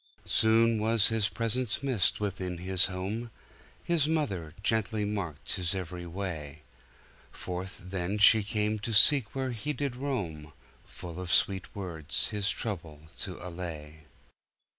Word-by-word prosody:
Soon 115 0 +4
was 110 -1 +4
his 110 -3 +1
presence 115 +4 0
missed 130 -8 +2
within 95 -3 -3
his 95 +1 +2
home; 100 +6 -4 0.5
His 165 -4 +2
mother 100 - -1
gently 110 -1 +1
marked 100 -6 -3
his 90 0 -1
every 90 -1 -5
way; 80 -5 -5 0.7
Forth 90 +1 -6
then 95 +1 -2
she 105 +1 +7
came 105 +1 0
to 110 +3 -4
seek 130 0 +6
where 130 -1 -1
he 135 +6 -3
did 140 -2 -2
roam. 90 - -4 0.3
Full 85 0 -8
of 90 -1 -4
sweet 95 -2 +1
words 85 -6 -2
his 105 0 0
trouble 80 -10 -5
to 95 -3 -4
allay. 80 -3 -7
100 Hz, 135 wpm, -30 LUFS, 90-115 Hz, 0.7 s, she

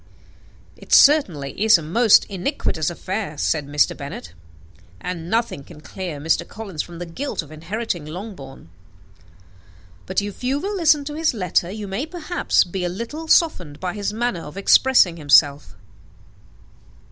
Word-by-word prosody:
"It - - -16
certainly 180 - +5
is 220 -3 +7
a 165 - -7
most 215 +7 +4
iniquitous 185 - -2
affair," 185 -1 -5
said 150 -1 -1
Mr. 145 +1 +1
Bennet; 140 -12 -8 0.7
"and 175 -2 -6
nothing 225 -10 -1
can 150 - -14
clear 175 -1 -7
Mr. 160 +3 +1
Collins 195 -8 -6
from 170 -1 -10
the 175 - -6
guilt 245 +6 -4
of 150 - -15
inheriting 175 +1 -4
Longbourn. 155 - -9 1.4
But - - 0
if 205 +3 -6
you 265 +3 0
will 405 +6 -3
listen 310 -5 +3
to 295 - -5
his 315 -4 0
letter, 180 -3 0
you 210 +1 -6
may, 205 +11 -3
perhaps, 350 +1 0
be 180 +1 -5
a 175 - -1
little 235 - -6
softened 180 - +2
by 180 -1 -3
his 205 -1 -3
manner 225 -5 -2
of 150 +2 -10
expressing 200 -3 +4
himself." 145 -5 +3
185 Hz, 150 wpm, -21 LUFS, 160-240 Hz, 1.4 s, is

